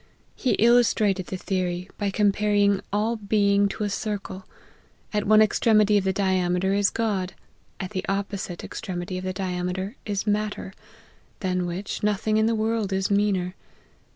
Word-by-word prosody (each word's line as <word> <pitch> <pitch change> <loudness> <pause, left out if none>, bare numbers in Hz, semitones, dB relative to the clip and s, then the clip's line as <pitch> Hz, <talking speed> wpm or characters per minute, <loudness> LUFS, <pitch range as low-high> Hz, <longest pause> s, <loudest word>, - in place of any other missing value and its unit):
He 255 - +1
illustrated 220 -5 +3
the 190 - -4
theory, 180 -1 -2
by 205 -1 0
comparing 205 0 +2
all 215 +3 0
being 200 -1 +2
to 210 - -4
a 205 - 0
circle: 200 -2 -4 0.7
at 210 -1 0
one 215 +1 +7
extremity 215 -1 +3
of 190 - -5
the 190 - +2
diame 185 -2 +1
ter 190 +1 +1
is 200 0 +3
God, 200 -5 -1 0.5
at 185 - -5
the 190 -2 -3
opposite 195 -2 -3
extremity 185 0 -5
of - - -8
the 185 - -2
diame 180 -1 -2
ter 190 +3 -4
is 205 -2 -2
matter, 210 -2 -2 0.7
than 180 -2 0
which, 180 +4 -4
nothing 210 +1 +1
in 220 0 +3
the 230 - +1
world 220 -2 0
is 190 +1 0
meaner. 200 -3 +1
200 Hz, 160 wpm, -25 LUFS, 185-210 Hz, 0.7 s, one